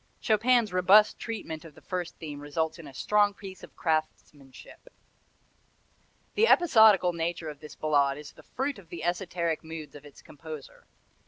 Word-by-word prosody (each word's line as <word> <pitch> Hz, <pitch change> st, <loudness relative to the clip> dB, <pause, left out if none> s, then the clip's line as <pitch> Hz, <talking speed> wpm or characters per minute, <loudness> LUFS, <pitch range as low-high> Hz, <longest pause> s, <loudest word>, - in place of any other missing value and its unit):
Chopin's 225 Hz, -1 st, +2 dB
robust 190 Hz, +4 st, +5 dB
treatment 185 Hz, -9 st, -6 dB
of 160 Hz, -3 st, -13 dB
the -, -, -16 dB
first 180 Hz, -3 st, -4 dB
theme 150 Hz, -3 st, -7 dB
results 160 Hz, +3 st, -3 dB
in 160 Hz, -, -10 dB
a -, -, -10 dB
strong 205 Hz, +3 st, +2 dB
piece 190 Hz, -2 st, -10 dB
of -, -, -13 dB
craftmanship. 155 Hz, -, -4 dB, 1.4 s
The 450 Hz, +2 st, +3 dB
episodical 220 Hz, -, +5 dB
nature 170 Hz, -1 st, -3 dB
of 150 Hz, -2 st, -9 dB
this 150 Hz, 0 st, -11 dB
Ballade 140 Hz, -3 st, +1 dB
is 150 Hz, 0 st, -10 dB
the -, -, -17 dB
fruit 270 Hz, -1 st, -4 dB
of 175 Hz, -, -17 dB
the 170 Hz, -, -7 dB
esoteric 175 Hz, -2 st, -2 dB
moods 160 Hz, -1 st, -8 dB
of 145 Hz, -, -12 dB
its 145 Hz, -1 st, -15 dB
composer. 150 Hz, -1 st, -11 dB
170 Hz, 160 wpm, -28 LUFS, 155-205 Hz, 1.4 s, robust